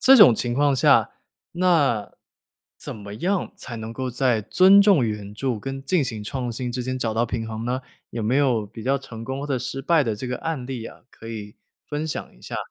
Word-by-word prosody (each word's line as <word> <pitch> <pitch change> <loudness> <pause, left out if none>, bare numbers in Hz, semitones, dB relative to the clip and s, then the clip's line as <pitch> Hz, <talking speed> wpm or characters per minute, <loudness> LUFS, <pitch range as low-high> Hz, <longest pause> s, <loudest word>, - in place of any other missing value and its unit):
这 270 0 +8
种 205 - +9
情 120 +1 -2
况 140 +2 +3
下， 130 - +4 0.4
那 160 - +2 0.6
怎 - - -7
么 100 -1 -9
样 180 - -1
才 120 - -6
能 110 0 -6
够 130 +2 -3
在 125 -2 +1
尊 190 - +6
重 190 - +4
原 105 -2 -4
著 115 0 -2
跟 135 0 -5
进 180 +1 +2
行 110 -5 -4
创 125 +1 -3
新 120 +1 -4
之 125 - -2
间 130 +1 -3
找 110 -3 -1
到 115 +2 +2
平 115 -2 -3
衡 110 0 -5
呢？ 125 +2 -2 0.3
有 115 - -4
没 115 +5 +1
有 125 -7 +2
比 110 +2 -10
较 135 +3 +1
成 115 -4 -9
功 130 +3 -4
或 145 - -4
者 140 - 0
失 125 +2 -4
败 160 +3 +3
的 115 -5 -2
这 115 - -5
个 125 0 -2
案 160 -6 -3
例 125 -4 -5
啊， - - -13
可 115 - -12
以 105 -2 -7 0.3
分 150 +1 -3
享 155 - -5
一 - - -22
下。 - - -5
125 Hz, 245 characters per minute, -24 LUFS, 115-140 Hz, 0.6 s, 种